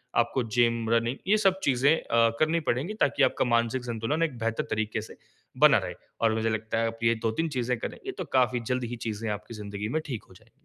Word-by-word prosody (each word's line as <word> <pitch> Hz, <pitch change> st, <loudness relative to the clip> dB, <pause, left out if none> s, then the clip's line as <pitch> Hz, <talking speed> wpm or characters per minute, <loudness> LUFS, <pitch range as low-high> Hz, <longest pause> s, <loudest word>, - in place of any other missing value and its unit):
आपको 120 Hz, +2 st, +2 dB
gym, 115 Hz, 0 st, +1 dB
running 115 Hz, +3 st, +1 dB
ये 215 Hz, +2 st, +5 dB
सब 195 Hz, -2 st, +2 dB
चीज़ें 135 Hz, +3 st, +4 dB
अ, 115 Hz, 0 st, +2 dB
करनी 160 Hz, +2 st, +3 dB
पड़ेंगी 140 Hz, -, 0 dB
ताकि 180 Hz, -9 st, +2 dB
आपका 130 Hz, -, +2 dB
मानसिक 120 Hz, +1 st, +1 dB
संतुलन 120 Hz, +8 st, -1 dB
एक 140 Hz, -7 st, -2 dB
बेहतर 115 Hz, 0 st, -1 dB
तरीक़े 110 Hz, 0 st, -1 dB
से 110 Hz, -, -12 dB, 0.4 s
बना -, -, +8 dB
रहे -, -, -3 dB, 0.3 s
और 115 Hz, -1 st, +3 dB
मुझे 110 Hz, 0 st, 0 dB
लगता 110 Hz, 0 st, -2 dB
है 115 Hz, -, +1 dB
आप 115 Hz, 0 st, -6 dB
ये 115 Hz, 0 st, +4 dB
2-3 135 Hz, +9 st, 0 dB
चीज़ें 125 Hz, 0 st, 0 dB
करेंगी, 375 Hz, -, -7 dB
ये 390 Hz, -, -1 dB
तो -, -, -2 dB
काफ़ी 125 Hz, -1 st, +2 dB
जल्द 125 Hz, 0 st, 0 dB
ही 120 Hz, 0 st, -4 dB
चीज़ें 110 Hz, +1 st, -3 dB
आपकी 105 Hz, +2 st, -5 dB
ज़िंदगी 105 Hz, -1 st, -5 dB
में 155 Hz, +6 st, 0 dB
ठीक 125 Hz, -8 st, -5 dB
हो -, -, -15 dB
जाएँगी। 90 Hz, -, -21 dB
115 Hz, 225 wpm, -27 LUFS, 110-130 Hz, 0.4 s, बना